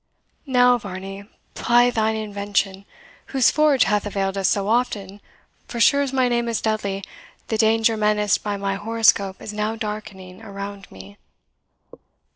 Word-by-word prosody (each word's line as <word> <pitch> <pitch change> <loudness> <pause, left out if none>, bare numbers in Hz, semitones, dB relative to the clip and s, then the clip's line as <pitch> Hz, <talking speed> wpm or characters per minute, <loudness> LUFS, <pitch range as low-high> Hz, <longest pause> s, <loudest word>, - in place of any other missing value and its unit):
Now, 250 -1 +4
Varney, 195 0 -8 0.3
ply 240 +1 +3
thine 220 -1 0
invention, 200 -2 -2 0.4
whose 265 -3 +3
forge 300 -4 +4
hath 210 0 0
availed 195 -1 -2
us 195 -1 +1
so 200 0 0
often 205 -4 -1 0.5
for 235 - -6
sure 280 +4 +5
as 275 -2 -1
my 260 -2 +2
name 235 -1 0
is 230 - -1
Dudley, 200 -3 -2 0.5
the 220 - 0
danger 225 0 +3
menaced 210 -1 +1
by 205 -1 -3
my 195 0 -2
horoscope 205 -3 +2
is 210 - -6
now 215 +1 -2
darkening 205 -4 -7
around 200 0 -8
me." 95 +1 -13
210 Hz, 145 wpm, -22 LUFS, 195-230 Hz, 0.5 s, sure